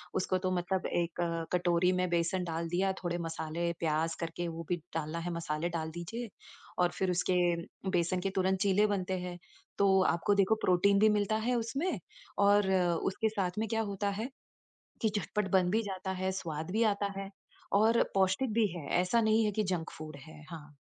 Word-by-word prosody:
उसको 185 0 +1
तो 185 - +1
मतलब 185 +1 -1
1 170 0 -1 0.3
कटोरी 175 0 +3
में 180 -1 0
बेसन 175 +2 +1
डाल 165 0 -3
दिया, 190 +3 +1
थोड़े 175 0 -1
मसाले, 165 0 -2
प्याज़ 160 0 0
करके 170 +1 -3
वो 165 0 -6
भी 175 - +1 0.2
डालना 160 +1 -2
है, 175 - -2
मसाले 165 0 -2
डाल 160 -2 -3
दीजिए। 225 +7 -5 0.5
और 175 -1 +3
फिर 190 -1 +2
उसके 180 +1 +1 0.6
बेसन 175 +1 +1
के 195 - 0
तुरंत 190 0 +2
चीले 200 0 +4
बनते 190 -2 -1
हैं। 180 0 -5 0.4
तो 190 -1 +4
आपको 185 +4 +2
देखो 200 +2 +4
प्रोटीन 200 +2 +4
भी 215 +1 +6
मिलता 210 0 +1
है 250 - +2
उसमें, 275 +10 -1 0.4
और 205 -1 +4 0.3
उसके 220 +3 0
साथ 190 -4 -2
में 220 - 0
क्या 225 0 +1
होता 200 +1 -1
है, 245 - -3 0.7
कि 220 - +3
झटपट 205 +1 -1
बन 185 -2 +4
भी 220 +3 +2
जाता 190 -2 -4
है, 190 0 +1
स्वाद 160 -3 -4
भी 220 +3 +2
आता 200 0 -2
है 195 0 -5 0.5
और 225 +2 +4
पौष्टिक 195 +6 +2
भी 230 -2 +4
है। 150 - -6
ऐसा 185 +6 +2
नहीं 220 0 +3
है 210 - 0
कि 215 +1 0
जंक 165 -2 -4
फूड 155 -2 -7
है। 155 -1 -12
हाँ। 150 -3 -10
185 Hz, 190 wpm, -31 LUFS, 170-205 Hz, 0.7 s, भी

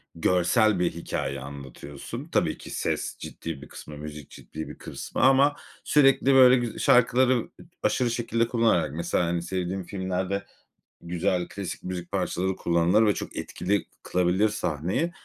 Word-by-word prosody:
görsel 90 +4 +3
bir 90 - +1
hikâye 75 -4 -4
anlatıyorsun. 70 +1 -8
Tabii - - +1
ki, - - -11
ses - - -2
ciddi 80 -5 -7
bir 75 - -10
kısmı, 75 -1 -10
müzik 75 -1 -8
ciddi 80 0 -8
bir - - -10
kısmı - - -5
ama 135 +2 +5 0.3
sürekli 135 -2 +4
böyle 130 -1 +8
güz 120 -2 -2
şarkıları, 125 +1 +5
ııı, 120 - -3 0.3
aşırı 120 -2 +1
şekilde 115 -1 0
kullanarak, 110 - +2
mesela, 85 +1 0
hani, 85 0 -1
sevdiğim 90 +1 -3
filmlerde 95 +1 -3 0.6
güzel, 90 +1 -1
klasik 95 -3 -6
müzik 90 -1 -5
parçaları 95 +1 -1
kullanılır 85 +6 +3
ve 105 - +4
çok - - -6
etkili 100 +3 -1 0.2
kılabilir 90 +4 +2
sahneyi. 95 - -1
95 Hz, 145 wpm, -26 LUFS, 85-115 Hz, 0.6 s, böyle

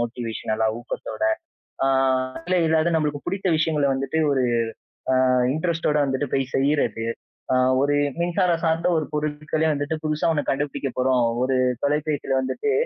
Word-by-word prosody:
மோட்டிவேஷன்லா 115 -2 -2
ஊக்கத்தோட. 120 - -6 0.6
ஆ. - - +2 0.6
இல்ல 185 0 +2
இல்லாத 160 +1 +2
நம்மளுக்கு 150 -2 -1
பிடித்த 195 -1 -1
விஷயங்கள 155 -3 +1
வந்துட்டு 135 +4 -1
ஒரு 130 -2 +2 0.9
ஆ, - - +4 0.2
இன்ட்ரெஸ்ட்டோட 160 -2 0
வந்துட்டு 135 +1 -1
போய் 135 -1 -1
செய்றது, 135 -5 +1 0.5
ஆ, - - +4 0.3
ஒரு 145 +1 +2 0.3
மின்சாரம் 175 -1 +1
சார்ந்த 165 +2 +1
ஒரு 155 - -1
பொருட்களே 150 +1 -1
வந்துட்டு 145 +3 -2
புதுசா 155 +2 +1
ஒண்ணு 145 - -2
கண்டுபிடிக்கப் 135 -2 -3
போறோம். 125 -1 +3 0.2
ஒரு 130 0 +1 0.3
தொலைபேசியில 145 -2 0
வந்துட்டு 425 - -1
150 Hz, 135 wpm, -23 LUFS, 135-160 Hz, 0.9 s, ஆ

